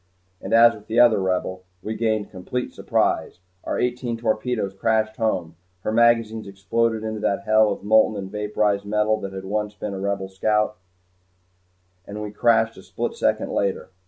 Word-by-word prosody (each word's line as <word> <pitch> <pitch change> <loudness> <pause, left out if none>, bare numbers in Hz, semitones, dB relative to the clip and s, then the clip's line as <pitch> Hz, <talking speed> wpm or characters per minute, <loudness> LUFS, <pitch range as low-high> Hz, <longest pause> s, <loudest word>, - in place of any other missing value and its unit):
And - - -6
as 115 +1 +7
with 105 -2 -14
the 115 +2 +1
other 120 -4 +6
Rebel 95 0 -2 0.2
we 110 - -3
gained 110 -2 -1
complete 105 +7 -4
surprise. - - 0 0.3
Our - - -2
eighteen 125 -1 -1
torpedoes 110 -2 -1
crashed 110 +2 0
home, 90 -7 -1 0.2
her 110 - -2
magazines 115 -1 +2
exploded, 110 +3 -1
and 110 - -2
into - - -6
that 100 -2 -1
hell 110 -1 +4
of 100 - -5
molten 110 0 +4
and 95 -1 -6
vaporized 105 -1 0
metal 105 +1 +1
that 100 -1 -5
had 95 0 -7
once 105 +1 -2
been 100 +1 -5
a 95 - -5
Rebel 100 -1 -2
scout 105 +2 0 1.3
we 105 0 -6
crashed 115 +1 +2
a - - -10
split - - -4
second - - 0
later. 100 -1 -1
105 Hz, 170 wpm, -23 LUFS, 100-110 Hz, 1.3 s, as